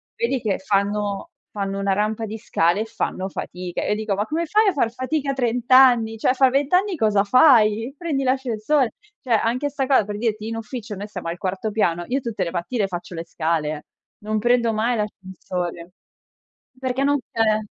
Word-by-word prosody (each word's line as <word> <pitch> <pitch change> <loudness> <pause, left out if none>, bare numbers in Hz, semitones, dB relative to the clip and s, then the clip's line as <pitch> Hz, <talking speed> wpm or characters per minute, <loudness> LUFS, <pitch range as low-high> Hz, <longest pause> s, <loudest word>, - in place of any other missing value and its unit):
vedi 465 - -1
che 210 -3 0
fanno 200 +1 -1 0.3
fanno 195 0 -2
una 195 -1 +1
rampa 215 +2 -1
di 220 +2 -5
scale, 190 -3 +1
e - - -2
fanno 190 -3 -3
fatica, 180 -1 -5
e - - -2
io 210 - +2
dico: 215 -1 -2
"Ma 205 +2 -1
come 330 +2 -1
fai 425 +6 +3
a 390 - +3
far 235 -6 +1
fatica 275 +2 -1
a - - -2
30 245 -1 -2
anni? 245 -4 +6
Cioè, 255 - +3
fa 265 0 +5
20 275 +3 +1
anni 380 0 +3
cosa 210 -6 +2
fai? 235 0 +4
Prendi 310 -6 -2
l'ascensor" 260 0 +1 0.4
Cioè, 250 - -6
anche 235 +5 +2
'sta 270 -2 -2
co 260 -7 +4
per 210 -1 -5
dirti, 220 -2 -2
in 225 - -4
ufficio 225 -1 -6
noi 205 +2 -6
stiamo 185 -5 -6
al 170 +1 -5
quarto 190 +4 -3
piano, 175 -5 0
io 270 +2 +1
tutte 230 -6 -3
le 170 - -3
mattine 195 +5 -1
faccio 175 -1 -6
le 165 0 -5
scale, 155 -2 -2 0.3
non 215 +1 -2
prendo 240 0 +2
mai 225 +2 0
l'ascensore 180 -3 -5 0.8
perché 260 +1 -1
non 285 0 +3
c'è. 220 -1 +2
220 Hz, 195 wpm, -22 LUFS, 195-255 Hz, 0.8 s, anni